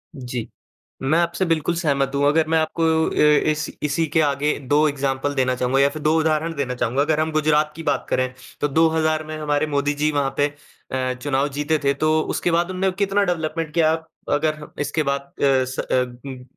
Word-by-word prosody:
जी। 125 -3 -5 0.6
मैं 150 +5 +2
आपसे 170 +2 0
बिल्कुल 165 +1 0
सहमत 140 -5 0
हूँ। 140 0 +2
अगर 155 +1 +3
मैं 160 0 +3
आपको 160 +1 -1 0.3
अ, - - -5 0.4
इस 155 0 -2
इसी 150 +2 0
के 160 - +5
आगे 145 0 +1
2 150 +2 +4
एग्ज़ाम्पल 140 0 -2
देना 130 -1 +1
चाहूँगा 125 +2 +1
या 140 - +5
फिर 155 +1 -8
2 155 +1 +3
उदाहरण 160 +1 0
देना 135 -4 -2
चाहूँगा। 125 +3 0
अगर 155 +1 +1
हम 160 0 0
गुजरात 155 0 +2
की 165 - -6
बात - - -1
करें, 130 0 0 0.3
तो 145 - +1
2000 155 +1 +2
में 155 0 -6
हमारे 150 0 0
मोदी 145 -1 0
जी 150 +1 +1
वहाँ 140 -2 0
पे 145 - +4 0.5
अ, 130 -1 -1
चुनाव 140 0 0
जीते 150 +3 -1
थे, 140 - +4
तो 155 +2 +2
उसके 175 - -1
बाद 170 +2 +1
उन्होंने 190 +1 0
कितना 200 0 +2
डेवलपमेंट 160 -3 -2
किया, 160 -2 +4 0.4
अगर 155 0 0
इसके 150 +2 0
बाद 140 -1 -3
अ, 135 -2 +4
स 130 +1 -7
अब 125 +1 -2
150 Hz, 200 wpm, -22 LUFS, 140-160 Hz, 0.6 s, के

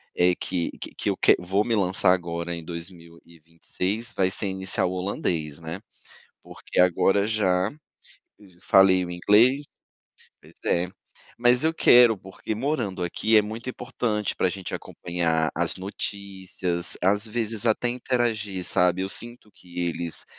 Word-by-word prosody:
é 90 0 +3
que 90 -3 -2
que - - -7
que - - -2
eu - - -1
quer - - +5
vou 95 +4 0
me 115 - +1
lançar 95 -2 +3
agora 85 -1 -3
em 85 - -6
2026, 85 +5 -6
vai 95 -1 +2
ser 100 +1 -1
iniciar 95 -1 0
o 90 - -1
holandês, 85 -5 -3
né. 80 +3 -6 0.6
Porque - - -3
agora, 95 +3 +3
já 95 -2 +1 0.9
falei 95 -2 +5
o 90 - -7
inglês 115 +11 +3 0.7
pois - - -19
é. 90 +1 +1 0.5
Mas 125 +3 +3
eu 160 - +3
quero 120 -7 +6
porque, 95 +3 -6
morando 110 -7 -2
aqui, 110 +5 +1
é 105 - +7
muito 110 +4 -7
importante 110 -5 -3
pra 95 - +2
gente 95 0 -6
acompanhar 80 -2 -2
as 85 0 0
notícias, 95 -2 -3
às 100 +4 +3
vezes 110 0 -2
até 115 +2 +1
interagir, 120 -6 -1
sabe? 90 +1 +2
Eu 95 - -2
sinto 120 0 -4
que 90 -1 -9
eles 85 -1 -3
95 Hz, 145 wpm, -25 LUFS, 90-110 Hz, 0.9 s, é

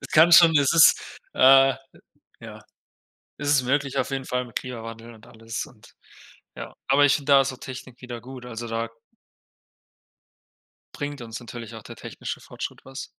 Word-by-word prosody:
Es - - -9
kann 160 +2 +6
schon 170 -2 +8
es 140 -1 +3
ist, 165 -2 +4 0.2
äh, 135 0 +6 0.7
ja - - -10 0.8
es 145 0 -4
ist 145 -3 +4
möglich 140 +1 -1
auf - - -1
jeden 135 -1 -4
Fall 125 0 -2
mit 120 - -17
Klimawandel 115 -1 -7
und 110 0 -18
alles 115 -1 -6
und, 110 -3 -19 0.7
ja. - - -8
Aber 140 +2 +4
ich 135 - +3
finde 145 -1 -1
da 135 -1 +6
so 130 0 -4
Technik 130 -1 -10
wieder 120 -2 -7
gut, 130 +1 -11
also 120 -1 -7
da 115 0 -3 2.0
bringt 145 -2 -6
uns 115 0 -7
natürlich 115 -1 -9
auch 110 - -10
der - - -11
technische - - -7
Fortschritt - - -8
was. 135 0 -8
130 Hz, 170 wpm, -24 LUFS, 115-140 Hz, 2.0 s, schon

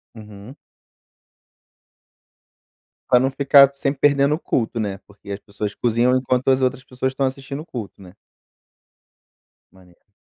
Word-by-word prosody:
Uhum. 105 +3 -12 2.5
Pra 125 - +6
não 130 +2 +1
ficar 140 0 +5
sempre 140 0 -2
perdendo 140 0 +3
o - - -10
culto, 115 -7 -2
né, 100 -3 -3
porque 100 0 -12
as 100 - -6
pessoas 105 0 -6
cozinham 120 +2 +1
enquanto 130 0 -1
as 130 0 +3
outras 130 0 -1
pessoas 130 +1 -3
estão 135 0 -1
assistindo 135 +2 -6
o 165 - -17
culto, 110 -5 -8
né? 90 -2 -13 1.6
Maneiro. 90 +1 -23
125 Hz, 135 wpm, -21 LUFS, 105-135 Hz, 2.5 s, Pra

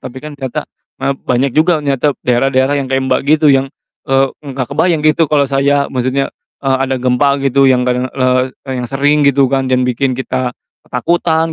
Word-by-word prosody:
tapi 130 0 -8
kan 150 0 -9
ternyata 130 -3 -5 0.3
maaf, 140 - -1
banyak 125 +1 0
juga 160 +1 +3
ternyata 140 0 0
daerah-daerah 130 +2 +2
yang 140 -2 -3
kayak 135 0 +1
Mbak, - - +2 0.2
gitu 150 - +2
yang, 135 0 +2 0.4
eee, 135 0 +3 0.2
nggak 135 -3 -4
kebayang 165 +2 +1
gitu, 155 +2 +3
kalau 145 -2 +3
saya 140 +1 +1
maksudnya, 130 +2 -1 0.3
eee, 135 -1 +1
ada 130 0 -2
gempa 130 +3 +2
gitu 135 0 +2
yang 125 -1 +2
kadang, 125 +1 -1
le 130 -1 +1 0.2
yang 130 -2 -3
sering 145 +3 +2
gitu 140 -1 +3
kan 135 0 0
yang 130 0 +2
bikin 125 +2 0
kita, 130 -1 -2 0.3
ketakutan 160 +4 0
135 Hz, 180 wpm, -14 LUFS, 130-145 Hz, 0.4 s, juga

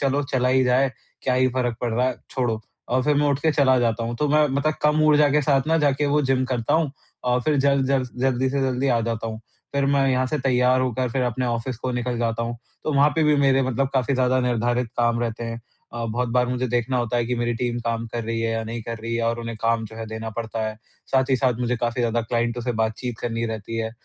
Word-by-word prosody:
चलो 140 +1 +1
चला 125 -1 +2
ही 130 0 +4
जाए, 125 +2 +3 0.3
क्या 125 - +1
ही 130 0 +3
फ़र्क 125 -3 0
पड़ 120 -2 -1
रहा 125 +3 +2
है, 130 - 0 0.2
छोड़ो। 120 -4 -1 0.3
और 130 +1 +2
फिर 150 +2 +2
मैं 145 +1 +3
उठकर 145 +3 +1
चला 130 -3 +4
जाता 115 -1 0
हूँ, 115 +1 -3
तो 150 +3 0
मैं 150 +1 +4
मतलब 140 +3 0
कम 150 +1 +3
ऊर्जा 150 -1 +5
के 150 +2 +3
साथ 135 -1 +2
ना 160 +1 +3
जाके 145 -1 +2
ना 145 - +1
वो 150 - +4
जिम 130 -1 +1
करता 125 +2 -1
हूँ 160 -3 +2 0.3
और 125 0 +2
फिर 150 +1 +1
जल्द 140 -1 +3
जल्द 130 -1 +1
जल्दी 130 0 +1
से 140 +1 0
जल्दी 130 +1 0
आ 120 -2 +3
जाता 115 0 -2
हूँ। 110 0 -5 0.3
फिर 140 0 +2
मैं 140 -1 +3
यहाँ 130 0 +1
से 150 +4 -1
तैयार 130 -1 +3
होकर 130 0 0
फिर 130 +2 0
अपने 125 +1 -1
ऑफिस 120 +1 -2
को 130 - -3
निकल 125 0 -2
जाता 115 -1 -1
हूँ, 120 +1 -3 0.3
तो 155 - 0
वहाँ 140 +1 +5
पे 160 - +3
भी 150 -1 +4
मेरे 135 -1 +3
मतलब 130 +1 0
काफ़ी 130 +1 +1
ज़्यादा 130 0 +2
निर्धारित 120 0 0
काम 120 -1 +2
रहते 115 0 -3
हैं। 115 0 -5 0.3
अ, 120 0 -4
बहुत 120 +2 -1
बार 125 +1 +2
मुझे 125 +1 -1
देखना 120 +2 0
होता 120 -1 0
है 120 - +1
कि 125 - -1
मेरी 120 0 -1
टीम 120 0 -2
काम 115 0 -1
कर 115 0 -4
रही 115 0 -2
है 115 - 0
या 115 0 -1
नहीं 115 +1 -5
कर 115 +1 -5
रही 115 +1 -4
है 115 - -1
और 115 0 0
उन्हें 115 -1 -5
काम 115 -1 +1
जो 110 +1 -10
है 115 0 -5
देना 110 +1 -5
पड़ता 115 -1 -3
है। 110 0 -5 0.4
साथ 130 0 +2
ही 130 - +4
साथ 130 -1 +2
मुझे 125 0 0
काफ़ी 120 +1 -1
ज़्यादा 120 0 +1
क्लाइंटों 120 +1 -1
से 125 - -1
बातचीत 110 +1 -3
करनी 115 -1 -2
रहती 110 0 -5
है। 110 0 -2
125 Hz, 265 wpm, -23 LUFS, 115-135 Hz, 0.4 s, ऊर्जा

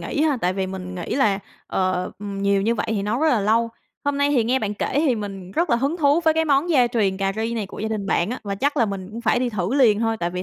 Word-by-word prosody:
nghĩ 295 - -2
ha, 300 -4 +2
tại 180 +1 +1
vì 190 0 -2
mình 185 -1 -6
nghĩ 175 - -4
là, 215 -8 +2 0.3
ờ, 185 -1 -1
ừm, 200 -1 -5
nhiều 200 0 +2
như 230 +3 +1
vậy 225 - -2
thì 210 -3 0
nấu 215 +5 -1
rất 320 - +3
là 245 -7 +3
lâu. 225 +3 +2 0.4
Hôm 285 0 0
nay 285 0 +2
thì 245 -6 +2
nghe 255 +3 +2
bạn 210 -2 -3
kể - - -2
thì 285 -3 +3
mình 195 -4 -6
rất 335 - 0
là 235 - +4
hứng 275 +7 -1
thú 295 0 +3
với 315 -1 +4
cái 320 0 +2
món 295 +3 +2
gia 255 -6 +5
truyền 210 -5 0
cà 195 0 0
ri 225 +1 -1
này 215 -4 -2
của - - -11
gia 220 - -2
đình 210 -3 -3
bạn 190 +2 +1
á, 250 - -3
và 200 -1 -2
chắc 285 +8 0 0.2
mình 195 -2 -5
cũng 230 +2 -7
phải 235 0 +2
đi 250 0 0
thử 210 +3 -2
liền 225 -7 +4
thôi 225 -1 0
tại 170 0 -1
vì 180 +1 -4
220 Hz, 305 wpm, -22 LUFS, 195-265 Hz, 0.4 s, gia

